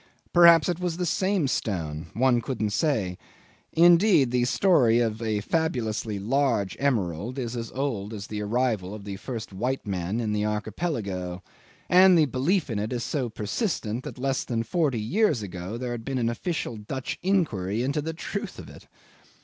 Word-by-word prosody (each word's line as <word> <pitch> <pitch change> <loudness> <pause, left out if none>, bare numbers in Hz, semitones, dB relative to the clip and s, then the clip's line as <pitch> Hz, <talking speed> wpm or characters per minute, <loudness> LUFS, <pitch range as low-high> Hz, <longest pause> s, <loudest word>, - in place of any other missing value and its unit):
Perhaps 170 -2 +7
it 175 -1 -1
was 175 -2 -2
the 180 - -1
same 185 -1 +1
stone 80 -11 -2
one 120 0 +3
couldn't 115 -5 -2
say. 100 - 0 0.5
Indeed 170 - +5
the 125 -1 +2
story 125 - +4
of 115 -2 0
a 110 -2 -1
fabulously 110 -7 -1
large 115 -2 0
emerald 115 - -1
is 125 -2 -3
as 115 -2 -5
old 120 -7 -2
as 105 -2 -6
the 105 -1 -5
arrival 105 -3 -1
of 105 - -9
the 100 -1 -6
first 115 -2 -6
white 125 +7 -2
men 95 +2 -2
in 110 -3 -1
the 105 0 0
Archipelago; 105 - -3 0.4
and 185 0 +7
the 155 - +5
belief 150 +7 0
in 105 - -1
it 105 +1 -3
is 120 -2 -2
so 130 -2 -2
persistent 115 - -2
that - - -8
less 135 +1 -1
than 115 -2 -2
forty 140 -1 0
years 150 - +1
ago 95 +2 -6
there 125 0 -4
had 120 -1 -5
been 135 +1 -3
an 115 -2 +1
official 120 -1 -3
Dutch 130 +5 -5
inquiry 120 - 0
into 140 +3 0
the 160 +2 -4
truth 200 +5 -5
of - - -10
it. - - -15
120 Hz, 175 wpm, -26 LUFS, 105-150 Hz, 0.5 s, Perhaps